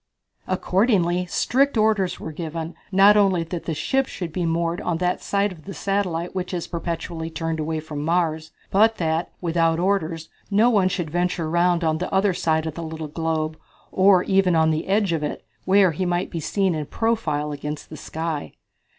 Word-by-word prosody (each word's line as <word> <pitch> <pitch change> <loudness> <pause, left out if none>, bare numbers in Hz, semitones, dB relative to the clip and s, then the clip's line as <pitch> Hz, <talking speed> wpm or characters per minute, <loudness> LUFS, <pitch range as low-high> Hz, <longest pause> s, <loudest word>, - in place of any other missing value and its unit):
Accordingly 185 -2 +1
strict 270 +7 +1
orders 215 -4 +2
were 160 - -6
given, 165 +1 -5 0.2
not 200 +2 +6
only 195 -5 +3
that 165 +1 -6
the 160 - -2
ships 270 - 0
should 170 -4 -6
be 175 -1 -1
moored 170 +1 -1
on 175 -2 -1
that 180 +1 -1
side 200 0 0
of 160 -4 -13
the 195 - -7
satellite 185 -4 -1
which 185 -1 -3
is 170 - -3
perpetually 165 -1 -4
turned 165 -1 -3
away 155 +1 -2
from 150 -2 -6
Mars, 160 -1 0 0.2
but 220 +3 +4
that, 160 0 -1
without 165 -1 +1
orders, 170 -4 0 0.2
no 215 +4 +4
one 195 -4 +3
should 175 -4 -3
venture 175 -1 -1
around 175 +1 +2
on 160 -1 +1
the 180 - -3
other 195 0 +3
side 160 -2 0
of 160 - -3
the 170 - -6
little 160 -1 -5
globe, 160 0 -2 0.3
or 190 -1 +5
even 190 -3 +3
on 160 0 +4
the 155 +1 -2
edge 200 -2 +2
of 160 - -1
it, 150 - -4 0.2
where 190 -1 +5
he 165 +4 -3
might 175 0 -1
be 170 - -3
seen 190 +3 0
in 155 -2 -3
profile 160 -11 -1
against 150 +1 -6
the - - -6
sky. 160 -2 -4
170 Hz, 190 wpm, -23 LUFS, 160-190 Hz, 0.3 s, not